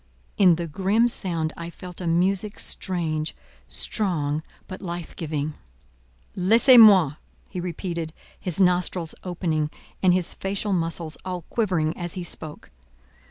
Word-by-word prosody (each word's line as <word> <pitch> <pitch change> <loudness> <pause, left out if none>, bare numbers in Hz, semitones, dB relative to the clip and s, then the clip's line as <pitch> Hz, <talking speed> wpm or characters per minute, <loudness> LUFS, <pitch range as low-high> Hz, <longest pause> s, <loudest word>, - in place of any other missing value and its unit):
in 180 -4 +6
the 170 +1 -3
grim 195 +8 +2
sound 170 -8 -1
I 170 0 -6
felt 180 +1 -9
a 175 - -3
music 190 +5 +1
strange, 160 -4 -2 0.3
strong, 155 -8 -1 0.3
but 185 - -8
life 175 -3 -6
giving. 155 -2 -3 0.8
"Laissez 230 +7 +6
moi!" 185 -10 +7 0.3
he 185 - -5
repeated, 170 -2 -4 0.3
his 180 -1 +2
nostrils 180 -2 +2
opening, 165 -4 -1 0.3
and 185 - +5
his 180 -1 +2
facial 200 +1 -2
muscles 165 -2 -2
all 180 -2 -4
quivering 180 -9 0
as 175 -2 -5
he 180 - -4
spoke. 155 -3 -5
175 Hz, 130 wpm, -24 LUFS, 165-190 Hz, 0.8 s, moi